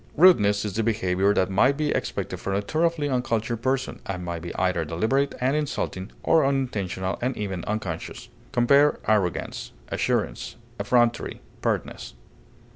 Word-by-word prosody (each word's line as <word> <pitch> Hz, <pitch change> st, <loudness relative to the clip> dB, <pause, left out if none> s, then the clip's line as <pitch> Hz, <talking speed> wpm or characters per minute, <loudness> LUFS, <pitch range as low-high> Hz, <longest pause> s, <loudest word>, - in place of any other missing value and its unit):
Rudeness 105 Hz, -, +5 dB
is 105 Hz, -, -3 dB
the 115 Hz, -, 0 dB
behavior 100 Hz, -3 st, +1 dB
that 95 Hz, +1 st, +1 dB
might 130 Hz, +8 st, +3 dB
be 155 Hz, -1 st, 0 dB
expected -, -, -2 dB
from 95 Hz, -, -2 dB
a 100 Hz, -, +1 dB
thoroughly 160 Hz, +3 st, 0 dB
uncultured 120 Hz, -3 st, -1 dB
person, 130 Hz, +1 st, -1 dB
and 90 Hz, -2 st, -4 dB
may 85 Hz, -1 st, -3 dB
be 85 Hz, +1 st, -6 dB
either 90 Hz, -3 st, +1 dB
deliberate 110 Hz, -, 0 dB
and 130 Hz, +3 st, +1 dB
insulting 125 Hz, -9 st, -2 dB
or 160 Hz, -, +4 dB
unintentional 105 Hz, -9 st, -1 dB
and 125 Hz, +1 st, -1 dB
even 95 Hz, -4 st, -3 dB
unconscious. 100 Hz, -6 st, -4 dB, 0.2 s
Compare 140 Hz, +5 st, +4 dB
ARROGANCE; 100 Hz, -5 st, 0 dB, 0.2 s
ASSURANCE; -, -, -1 dB, 0.2 s
EFFRONTERY; 120 Hz, -1 st, +1 dB, 0.2 s
PERTNESS. -, -, -2 dB
110 Hz, 140 wpm, -25 LUFS, 95-135 Hz, 0.2 s, Rudeness